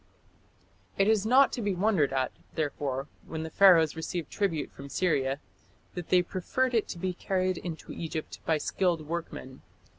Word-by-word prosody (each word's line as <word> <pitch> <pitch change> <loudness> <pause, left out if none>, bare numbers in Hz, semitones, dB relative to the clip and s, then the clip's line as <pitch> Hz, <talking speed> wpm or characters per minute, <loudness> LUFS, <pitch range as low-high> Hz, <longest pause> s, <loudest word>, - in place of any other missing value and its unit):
" - - -35
It 195 - +3
is 220 -1 +3
not 265 +3 +6
to 245 - -3
be 205 -3 0
wondered 185 -7 +2
at, 130 -1 0 0.2
therefore, 140 -3 -2 0.2
when 160 -1 -4
the 160 - -6
Pharaohs 170 -6 +6
received 160 0 -4
tribute 165 -8 -1
from 140 0 -10
Syria 140 -4 +1 0.5
that 180 -2 -6
they 180 -1 +5
preferred 245 +9 -1
it 225 -3 +2
to - - -6
be 185 +1 -2
carried 185 0 -1
into 165 -3 -7
Egypt 160 -1 -5
by 160 - +2
skilled 170 -1 0
workmen. 160 -5 -5
170 Hz, 170 wpm, -29 LUFS, 155-190 Hz, 0.5 s, not